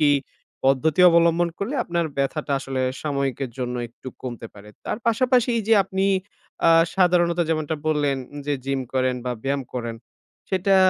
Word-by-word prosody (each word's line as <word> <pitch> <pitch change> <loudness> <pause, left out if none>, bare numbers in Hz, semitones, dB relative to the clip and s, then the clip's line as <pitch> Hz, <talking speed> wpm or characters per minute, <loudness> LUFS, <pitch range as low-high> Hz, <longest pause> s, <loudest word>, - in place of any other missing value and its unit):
কি 150 -1 +5 0.5
পদ্ধতি 140 +5 +3
অবলম্বন 170 +1 +4
করলে 230 +9 -3
আপনার 170 -1 -1
ব্যথাটা 140 +1 -1
আসলে 135 -1 -3 0.2
সাময়িকের 140 -3 -2
জন্য 125 -1 -2
একটু 120 +3 -11
কমতে 120 -3 -6
পারে। 105 +1 -13 0.2
তার - - -3
পাশাপাশি 245 +2 +3
এই - - -1
যে 225 - +7
আপনি 190 +1 -1 0.6
আ - - +7 0.3
সাধারণত 175 -2 +3
যেমনটা 155 -1 -1
বললেন, 145 -3 +1 0.3
যে 145 - +1
জিম 135 -1 0
করেন 130 -1 +2
বা 125 - 0
ব্যায়াম 140 0 0
করেন 115 -2 -3 0.5
সেটা 190 +1 +3
150 Hz, 155 wpm, -23 LUFS, 135-175 Hz, 0.6 s, যে